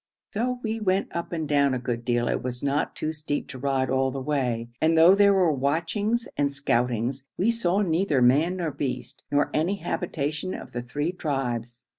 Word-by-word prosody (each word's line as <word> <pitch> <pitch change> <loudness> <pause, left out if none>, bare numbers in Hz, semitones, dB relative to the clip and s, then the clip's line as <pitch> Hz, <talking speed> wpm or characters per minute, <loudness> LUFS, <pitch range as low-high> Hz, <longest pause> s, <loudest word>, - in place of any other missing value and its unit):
Though 250 +4 0
we 225 0 -2
went 195 -2 0
up 170 - -3
and 160 -3 -2
down 140 -2 +3
a - - 0
good 120 -1 -3
deal, 120 0 +1
it - - 0
was 125 0 -5
not 140 +1 0
too 155 +1 -2
steep 150 -1 -3
to 130 -2 -7
ride 135 -1 0
all 130 0 +2
the 135 +1 -4
way, 130 -5 -1
and 160 +1 +3
though 165 +3 +8
there 200 0 +5
were 180 -4 +4
watchings 175 - 0
and 140 -1 +1
scoutings, 125 -1 -1
we 210 +6 +3
saw 205 -4 +1
neither 165 -4 +1
man 145 +9 +4
nor 170 -4 -2
beast, 130 -2 -4
nor 145 0 +2
any 170 +6 +1
habitation 170 -2 -3
of - - -9
the 120 - -3
three 145 +7 -2
tribes. 125 -7 -3
145 Hz, 195 wpm, -26 LUFS, 130-175 Hz, -, though